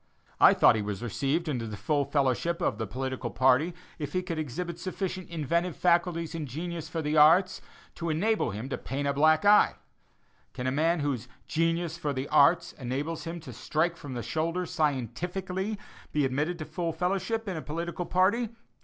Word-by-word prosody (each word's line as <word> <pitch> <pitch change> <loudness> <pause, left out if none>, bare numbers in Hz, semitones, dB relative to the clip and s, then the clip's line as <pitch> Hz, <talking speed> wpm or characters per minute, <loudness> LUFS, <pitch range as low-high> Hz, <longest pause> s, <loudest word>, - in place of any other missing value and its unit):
I - - +8
thought - - +6
he 110 - 0
was 105 +1 -4
received 140 - -1
into 125 -6 -2
the 105 -1 -6
full 145 +2 0
fellowship 140 +5 0
of - - -1
a 110 - -2
political 130 +3 -3
party 130 - +3 0.2
if 145 -2 -4
he 185 - 0
could 170 -3 -3
exhibit 170 +4 -4
sufficient 185 0 -4
"inventive 170 +2 -1
faculties 170 -2 +1
and 160 -3 -4
genius 165 +4 -5
for 160 0 -3
the 150 +1 0
arts," 165 +5 +5 0.4
to 170 - -3
enable 205 +8 +1
him 105 +6 -5
to - - -3
paint 140 +2 -3
a 140 - +1
black 155 +4 +4
eye. 210 +1 +6 0.8
Can 125 - -5
a 130 - +1
man 160 +4 +2
whose 130 -5 -2 0.2
"genius 165 +1 0
for 145 -3 -1
the 130 +1 -3
arts" 140 - +4
enables 140 +7 -3
him 170 +1 -5
to 155 - -9
strike 165 +2 0
from 145 -5 -8
the 120 - -3
shoulder 165 - -1
scientifically, 180 - -2 0.3
be 150 -2 +2
admitted 150 +7 -1
to 155 - -6
full 170 -1 -3
fellowship 195 +6 -1
in 190 - -2
a 160 - -4
political 170 +3 -4
party? 205 +6 +2
160 Hz, 185 wpm, -28 LUFS, 140-175 Hz, 0.8 s, I